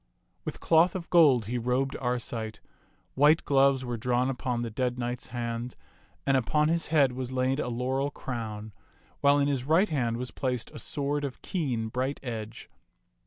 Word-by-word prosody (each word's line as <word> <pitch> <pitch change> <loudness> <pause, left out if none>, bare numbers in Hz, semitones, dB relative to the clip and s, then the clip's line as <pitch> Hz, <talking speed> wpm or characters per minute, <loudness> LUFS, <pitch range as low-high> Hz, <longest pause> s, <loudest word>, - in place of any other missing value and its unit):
With - - -5
cloth 170 +2 +4
of 175 -2 -6
gold 145 - +6
he 120 +3 -2
robed 125 +3 0
Arcite. 120 -3 -3 0.5
White 150 +4 +4
gloves 135 -2 +3
were 120 -1 -3
drawn 125 +3 +1
upon 125 -2 -2
the 115 - -4
dead 125 +2 -1
knight's 120 0 -3
hands, 120 0 -4 0.5
and 135 - +3
upon 150 +5 +2
his 165 0 0
head 145 -5 +4
was 130 0 -5
laid 130 +1 0
a - - -1
laurel 130 +3 -1
crown, 110 -6 -6 0.5
while 140 0 +5
in 140 0 +2
his 135 -3 0
right 165 +9 +3
hand 120 -6 0
was 125 +1 -5
placed 125 -3 -3
a - - -9
sword 145 0 -2
of 140 -3 -5
keen, 125 - -2
bright 130 +4 -2
edge. 110 -3 -6
130 Hz, 170 wpm, -28 LUFS, 120-140 Hz, 0.5 s, gold